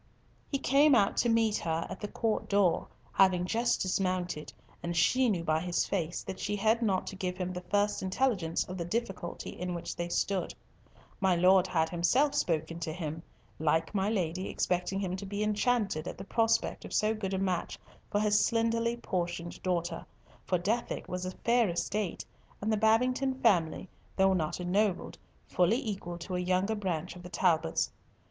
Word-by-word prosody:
He 275 - 0
came 275 +2 +5
out 200 -4 +3
to 240 - +3
meet 225 -2 +3
her 165 0 -2
at 185 - -7
the 210 - -4
court 220 +1 -1
door, 200 -4 +2 0.3
having 185 -2 +4
just 230 +5 +1
dismounted, 185 -4 -1 0.3
and 170 0 -3
she 250 +9 +4
knew 180 -6 0
by 155 -1 +1
his 175 +1 0
face 175 -3 -2
that 190 - -6
she 205 0 -1
had 220 +3 +2
not 195 -5 +1
to - - -6
give 180 -1 -3
him 185 -1 -3
the 180 - -5
first 205 +3 0
intelligence 190 -4 0
of 185 0 -7
the - - -1
difficulty 190 -2 -4
in 180 0 -4
which 170 - -5
they 175 0 -3
stood. 185 0 -1 0.6
My 190 -2 +3
Lord 185 +2 +5
had 160 -3 +1
himself 235 - +2
spoken 165 0 -1
to 160 -1 -3
him, 160 -1 -5 0.4
like 160 +3 +1
my 195 0 +1
Lady 185 -3 -1
expecting 180 +2 -1
him 185 -2 -2
to 200 - -6
be 205 +1 -2
enchanted 210 -5 0
at - - -6
the - - -7
prospect 225 +3 +1
of - - -5
so 215 +1 +3
good 195 -3 -3
a - - 0
match 185 -2 -1 0.3
for 205 - +1
his 210 0 +3
slenderly 230 0 +1
portioned 175 -5 -3
daughter, 175 -2 -1 0.4
for 180 - +2
Dethick 215 +7 -2
was 180 0 -3
a 185 - -7
fair 235 -3 +4
estate, 175 +2 -2 0.3
and 215 +2 0
the - - +4
Babington 250 +5 +2
family, 185 -7 +2 0.3
though 190 0 +4
not 160 -3 -1
ennobled, 185 +2 0 0.3
fully 180 +6 +3
equal 195 -9 -4
to 180 +2 -5
a - - 0
younger 185 +4 +1
branch 180 -5 -3
of 180 - -10
the 180 - -9
Talbots. 165 - +1
190 Hz, 180 wpm, -30 LUFS, 175-215 Hz, 0.6 s, came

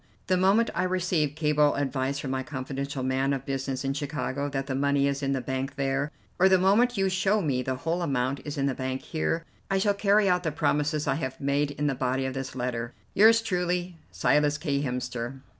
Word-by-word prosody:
The 185 - +2
moment 195 +5 +3
I - - 0
receive 180 -5 0
cable 150 -2 +3
advice 140 -1 -1
from 140 -2 -4
my 130 0 -1
confidential 135 0 -4
man 130 +2 +1
of 135 -1 -4
business 135 -1 -3
in 135 - 0
Chicago 145 -1 -3
that 135 -1 -2
the 135 - -3
money 140 +1 +2
is 140 0 -1
in 135 0 0
the 135 - -1
bank 130 +2 -3
there, 135 +1 -1 0.3
or 190 +1 +6
the 190 - +6
moment 210 +6 +3
you 195 0 +2
show 190 +3 +2
me 140 -9 0
the 130 +1 -2
whole 165 +6 -2
amount 135 -4 0
is 145 -1 -5
in 135 - +1
the 140 - +1
bank 130 0 -4
here, 165 +1 -2 0.2
I 195 - +2
shall 205 +1 +2
carry 200 0 +3
out 180 -1 +3
the 160 -3 -1
promises 150 +1 0
I - - +3
have 130 0 -4
made 140 +1 +1
in 145 +1 -3
the 145 - +2
body 130 +1 -1
of 130 - -2
this 135 -1 -5
letter. 120 -1 -3 0.2
"Yours 225 +2 +6
truly, 180 -3 -1 0.2
"SILAS 150 0 +2
K. 140 -4 -1
HEMSTER." 125 -2 -3
140 Hz, 215 wpm, -27 LUFS, 135-175 Hz, 0.3 s, or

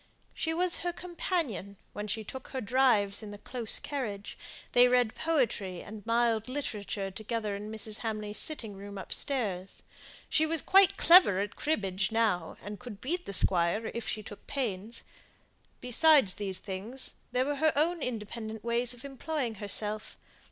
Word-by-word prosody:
She 320 - -2
was 350 +2 +3
her 350 - -2
companion 335 - -3 0.2
when 210 0 -5
she 220 +2 -2
took 260 +5 -8
her 260 - -4
drives 230 -4 +3
in 215 - -7
the 205 - -8
close 235 +1 +1
carriage; 215 -8 -4 0.4
they 245 0 +7
read 245 -2 +3
poetry 230 - 0
and 210 0 -9
mild 230 -1 +2
literature 210 -7 -3
together 215 0 -3
in 210 +2 -6
Mrs. 220 0 -4
Hamley's 215 -2 -3
sitting 235 -9 -1
room 200 +1 -8
upstairs. 195 -3 -2 0.4
She 315 0 +2
was 325 0 0
quite 390 0 +6
clever 335 - +7
at 205 +1 -3
cribbage 195 -10 -1
now, 215 -7 +1
and 205 +1 -7
could 240 -5 -9
beat 345 +9 -3
the - - -3
squire 185 +4 +2
if 235 - -4
she 215 - -3
took 205 - -11
pains. 225 -5 -3 0.8
Besides 250 - +5
these 195 -3 0
things, 205 +8 -3 0.2
there 250 +1 +1
were 290 0 -1
her 315 +2 +4
own 330 +3 +1
independent 220 -2 -5
ways 235 +1 +2
of 245 +3 -12
employing 275 -2 -3
herself. 210 +1 -1
225 Hz, 160 wpm, -30 LUFS, 205-270 Hz, 0.8 s, they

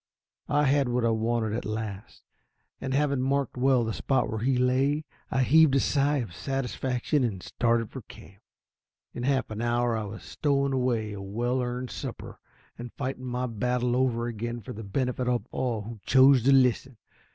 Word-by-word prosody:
I 145 +1 +3
had 140 -2 +2
what 120 -1 +1
I 115 - +3
wanted 110 -1 0
at 115 - -2
last, 110 -2 -6 0.6
and 130 - -4
having 140 -1 +1
marked 135 0 0
well 130 -1 +3
the 110 -1 -2
spot 135 +4 0
where 110 - -2
he 125 +3 +1
lay, 135 +4 +1 0.2
I 130 0 +1
heaved 155 +1 +5
a - - +5
sigh 145 +2 +2
of 115 -10 -4
satisfaction 135 - -1
and 100 -7 -2
started 115 -2 0
for 130 - -7
camp. 100 -2 -15 0.7
In - - -6
half 130 -2 0
an 110 +1 -4
hour 120 0 +1
I 110 -1 -2
was 105 +2 -8
stowing 140 -2 0
away 120 -5 0
a 100 - -7
well 120 +6 -1
earned 125 +1 -4
supper, - - -7 0.4
and 120 0 -7
fighting 130 -1 -4
my 125 0 -2
battle 125 +1 -1
over 125 -2 +1
again 120 +1 -4
for - - -8
the 110 - -8
benefit 125 +4 -2
of 120 -4 0
all 115 -5 -2
who 115 +1 -8
chose 130 0 +6
to 140 - +6
listen. 130 -1 +3
125 Hz, 185 wpm, -27 LUFS, 115-135 Hz, 0.7 s, chose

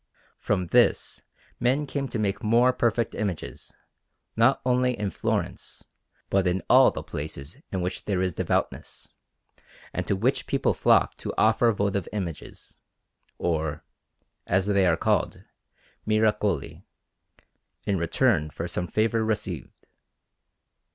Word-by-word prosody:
From 95 -3 0
this - - +2 0.4
men 130 +5 +1
came 140 -1 -3
to 125 - -4
make 100 -1 -1
more 120 +4 +4
perfect 120 -2 0
images, 75 - -4 0.6
not 120 +4 +4
only 125 -1 +2
in 100 -1 -2
Florence, - - -3 0.5
but 95 -1 +2
in 90 -1 0
all - - +8
the - - -6
places 75 - -7
in 95 - -2
which 90 +1 -4
there 100 -3 0
is 90 -1 0
devoutness, - - -2 0.8
and - - -3
to 100 - +1
which 120 +8 0
people - - +1
flock - - +3
to - - -5
offer 115 +2 +4
votive 100 -3 -1
images, 90 -7 -6 0.6
or, 80 -3 -2 0.6
as 95 +1 +2
they 100 -2 +3
are 85 -2 +3
called, - - 0 0.6
"miracoli," 105 -7 +1 1.0
in 100 -3 0
return 85 - +2
for 85 +3 -5
some 90 +1 -3
favour 110 +3 +1
received. 110 -1 -4
100 Hz, 125 wpm, -26 LUFS, 90-115 Hz, 1.0 s, all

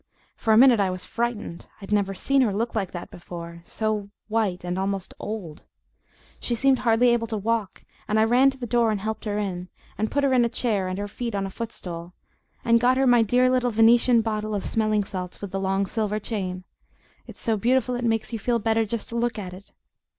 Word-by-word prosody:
For 225 - 0
a 215 - +6
minute 245 -2 +7
I 195 -2 +2
was 185 0 -5
frightened. 230 -7 -3
I'd 195 0 -10
never 200 -2 +1
seen 275 +8 +2
her 235 -5 +2
look 225 +4 -2
like 200 -5 -2
that 175 -1 -7
before 170 -1 -9
so 215 0 -2 0.2
white 210 -5 0
and 180 +1 -2
almost 195 -1 -2
OLD; 200 -8 -6 0.8
she 240 - -1
seemed 265 +2 +3
hardly 240 +1 +4
able 235 -1 +1
to 220 - -3
walk, 215 -1 -2 0.2
and 215 +1 +2
I - - +5
ran 245 +4 +5
to 270 - -7
the 250 - -5
door 235 0 +2
and 210 -2 0
helped 220 +2 -4
her 205 -1 -1
in, 185 -3 -3 0.3
and 215 +1 0
put 285 - 0
her 275 -1 +3
in 250 -2 +5
a 235 - +1
chair 210 -6 -1
and 185 0 -3
her 205 0 -3
feet 230 +1 -4
on 195 -1 -1
a 195 - -5
footstool, 180 -6 -7 0.5
and 230 0 +5
got 250 +1 +4
her 270 - +3
my 245 -2 +5
dear 245 +4 +3
little 255 -1 +2
Venetian 230 +1 +5
bottle 215 -1 -2
of 200 - -3
smelling 215 -2 +1
salts 185 -2 -6
with 200 -2 -6
the 195 - -2
long 195 +1 0
silver 210 0 -1
chain; 190 -4 -4 0.6
it's - - -12
so 225 - 0
beautiful 250 +4 +1
it 245 0 -3
makes 225 0 0
you 225 - -2
feel 235 +3 +1
better 225 0 +1
just 225 +1 -4
to 230 - -6
look 235 0 0
at 185 -3 -6
it. 190 +3 -13
220 Hz, 225 wpm, -25 LUFS, 195-235 Hz, 0.8 s, minute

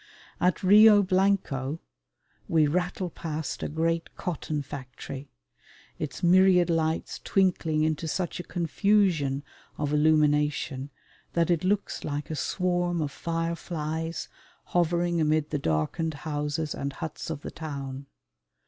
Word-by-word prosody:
At 180 0 +1
Rio 210 +2 +8
Blanco 185 -7 +1 0.7
we 160 -2 +4
rattle 180 +3 -1
past 160 -1 -4
a - - -2
great 165 +2 -1
cotton 155 -4 -3
factory, 135 0 -8 0.7
its 155 +4 -5
myriad 180 -1 +5
lights 160 -1 -1
twinkling 175 -5 +1
into 155 +1 0
such 175 +2 -2
a - - -4
confusion 170 -6 +1 0.3
of 145 0 -1
illumination 150 -3 +2 0.4
that 170 0 +2
it 170 -1 +1
looks 200 +2 0
like 145 +1 -4
a - - -2
swarm 175 +1 0
of 150 -3 -1
fireflies 165 0 -3 0.5
hovering 175 0 +2
amid 155 0 +1
the 150 - 0
darkened 140 - -1
houses 150 0 -2
and 140 0 -4
huts 160 +2 -6
of 160 -3 -4
the - - -6
town. 140 -3 -6
160 Hz, 120 wpm, -27 LUFS, 150-175 Hz, 0.7 s, Rio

